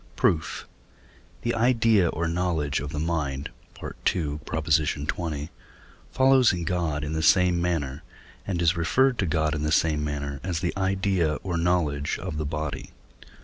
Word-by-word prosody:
Proof. 80 -2 0 0.8
The 120 - 0
idea 115 -5 +3
or 85 +1 -2
knowledge 85 -4 0
of 70 +1 -5
the 75 - -5
mind 75 -5 -2 0.3
(II. - - -3 0.5
xx.) 75 0 -1 0.6
follows 130 -1 +5
in 90 -2 -3
God 80 -4 -1
in 75 +1 -3
the 80 - -1
same 90 0 +4
manner, 75 -5 -1 0.5
and 90 -3 -1
is 85 +1 +3
referred 125 +10 +2
to 95 - +1
God 80 0 +1
in 75 - -2
the 75 0 -1
same 80 -2 +2
manner, 70 -1 -3
as 90 -2 -2
the 90 0 -2
idea 95 -4 +1
or 90 -3 -2
knowledge 85 -4 0
of 90 -5 -5
the 75 -1 -2
body. 75 -3 -4
80 Hz, 150 wpm, -26 LUFS, 75-90 Hz, 0.8 s, follows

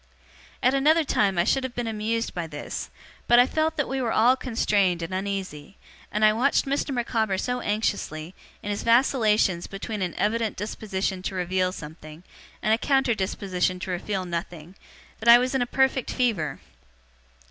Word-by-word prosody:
At 255 - +4
another 305 +4 +4
time 200 -9 +1
I 170 - +4
should 265 +7 +1
have 260 -2 -5
been 245 - -2
amused 225 +1 -2
by 170 -2 -4
this; 145 -2 -6 0.4
but 240 - +6
I 245 - +7
felt 315 +3 -1
that 290 - 0
we 270 0 -2
were 235 -3 -1
all 245 +4 +4
constrained 200 -8 0
and 170 +3 -5
uneasy, 190 -4 -4 0.3
and 215 +1 +2
I 215 - +5
watched 255 +6 +2
Mr. 280 +2 -1
Micawber 225 -5 0
so 250 +5 -2
anxiously, 180 -6 -2 0.3
in 205 - -3
his 205 - -3
vacillations 220 -7 +2
between 205 +1 -5
an 180 -3 -2
evident 220 0 0
disposition 195 -2 -3
to 190 - -4
reveal 185 0 0
something, 155 -1 -10 0.4
and 215 - +3
a 225 - +2
counter 270 -3 +2
disposition 190 -2 -1
to 185 - -4
reveal 185 +1 -3
nothing, 170 -1 -6 0.5
that 230 - +1
I 235 - +11
was 255 +2 0
in 265 - +1
a 245 - 0
perfect 265 -1 +1
fever. 195 - -1
210 Hz, 175 wpm, -25 LUFS, 185-245 Hz, 0.5 s, I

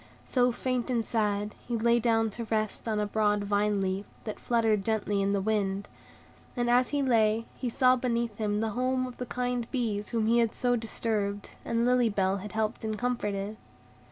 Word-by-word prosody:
So, 250 -1 +2
faint 250 0 -2
and 235 -3 0
sad, 210 -2 0
he 240 -1 -1
lay 235 +1 +3
down 225 -1 +2
to 230 +3 -5
rest 215 0 -1
on 215 -1 0
a 210 - +1
broad 210 0 +1
vine 205 0 +1
leaf, 190 +1 -2 0.2
that 215 - -5
fluttered 225 -4 +1
gently 210 -2 0
in 195 0 +1
the 200 - +1
wind; 200 -1 0 0.7
and 240 0 +1
as 245 0 +4
he 290 -1 0
lay, 225 -3 +3
he 250 - -3
saw 255 +2 +4
beneath 235 -3 -1
him 210 -1 0
the 225 -1 -1
home 255 +2 0
of 250 -1 -8
the 250 - -5
kind 245 -1 -2
bees 220 -6 -1
whom 225 -2 0
he 235 +2 +4
had 230 -1 +1
so 245 -1 +2
disturbed, 215 -3 -2
and 230 0 0
Lily 250 -1 +4
Bell 195 -1 +1
had 205 +2 -8
helped 220 +1 -1
and 215 -1 -2
comforted. 210 -4 -2
225 Hz, 195 wpm, -29 LUFS, 210-240 Hz, 0.7 s, as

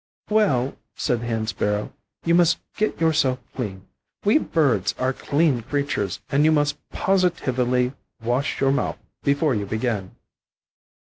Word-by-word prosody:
"Well," 140 - +2 0.2
said 120 -5 0
the 120 - -4
Hen 115 -2 -1
sparrow, 105 -1 -1 0.3
"you 170 - +3
must 175 0 +5 0.2
get 215 - -1
yourself 155 -6 +2 0.2
clean. 100 -6 -5 0.4
We 210 +9 +5
birds 120 - +1
are 130 +1 0
clean 145 -3 +1
creatures, 125 -7 -2
and 140 +2 +3
you 155 - +5
must 145 -1 +1
positively 130 -10 +1 0.3
wash 120 +4 -1
your 135 0 +3
mouth 140 - 0 0.2
before 140 +1 +2
you 100 -3 -2
begin." 110 -3 -2
130 Hz, 135 wpm, -23 LUFS, 115-155 Hz, 0.4 s, must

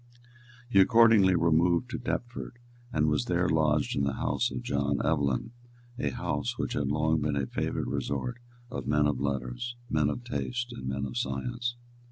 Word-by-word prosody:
He 100 -5 +4
accordingly 110 -2 +6
removed 85 +8 +3
to - - -3
Deptford, 120 0 -4 0.3
and 75 0 +2
was 75 -4 +1
there - - +1
lodged 75 -1 +2
in 70 - +1
the 70 -1 0
house - - 0
of 65 -2 -5
John 70 0 0
Evelyn, 70 - 0 0.5
a 70 - 0
house - - -2
which - - -2
had 70 -2 -1
long 75 +2 +1
been 75 0 0
a 70 -1 0
favourite - - -2
resort 125 0 -3 0.3
of 125 - -5
men 75 0 +3
of 75 -3 +1
letters, 70 - -3 0.2
men 75 -2 +2
of 120 - -4
taste 120 0 -3
and 65 - -7
men 70 +1 -2
of 65 - -5
science. 120 - -2
75 Hz, 175 wpm, -29 LUFS, 70-115 Hz, 0.5 s, accordingly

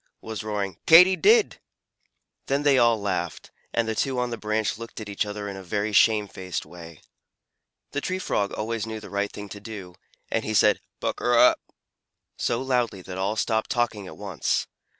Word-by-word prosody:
was 110 -1 -6
roaring 100 -4 -3
"Katy 180 +3 +9
did!" 430 - +4 0.9
Then 140 +2 0
they 140 -2 +5
all 115 -2 +4
laughed, 100 -2 -3 0.2
and 115 -1 0
the 110 - 0
two 130 +3 -1
on 125 -1 -1
the - - -2
branch 110 0 -1
looked 115 0 -8
at 110 - -7
each 100 0 -2
other 105 0 -5
in 100 - -5
a 95 - -7
very 105 +3 -2
shamefaced 100 -4 +2
way. 85 -1 -12 0.9
The 145 - -2
Tree 185 +4 -2
Frog 100 - -1
always 110 +1 -3
knew 110 0 -5
the 105 - -11
right 100 0 -1
thing 105 0 -8
to 100 - -8
do, 100 -4 -8 0.4
and 110 - 0
he 110 - -2
said - - +4 0.2
"Pukr - - -3
r - - +8
rup!" - - -4 0.7
so 120 +2 -1
loudly 120 -7 0
that 95 +1 -7
all 100 +3 0
stopped 110 0 0
talking 110 -5 -1
at - - -10
once. 100 -6 -1
110 Hz, 190 wpm, -25 LUFS, 100-120 Hz, 0.9 s, Katy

